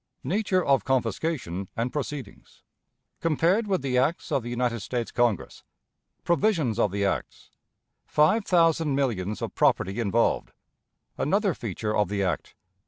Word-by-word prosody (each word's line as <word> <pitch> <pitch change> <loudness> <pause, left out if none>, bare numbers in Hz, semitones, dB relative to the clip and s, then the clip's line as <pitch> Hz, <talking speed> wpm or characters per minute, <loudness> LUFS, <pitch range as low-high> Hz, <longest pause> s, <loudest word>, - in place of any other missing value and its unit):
Nature 190 -2 +1
of 135 -6 +3
Confiscation 120 - -1
and 120 +2 -1
Proceedings. 145 -6 -6 0.6
Compared 170 +7 +2
with 190 -5 0
the 125 -2 +1
Acts 150 +7 0
of 135 - +2
the 120 - -6
United 120 -1 -1
States 120 +2 -3
Congress. 120 -6 0 0.6
Provisions 170 - +1
of - - +3
the 100 0 0
Acts. 95 - -3 0.6
Five 160 +9 +3
Thousand 165 -5 +3
Millions 105 -8 -1
of - - -4
Property 95 +5 +2
involved. 115 +1 +1 0.7
Another 195 +4 +2
Feature 105 - -3
of 105 -4 +2
the 100 -1 -1
Act. 90 -3 -2
125 Hz, 135 wpm, -26 LUFS, 105-165 Hz, 0.7 s, of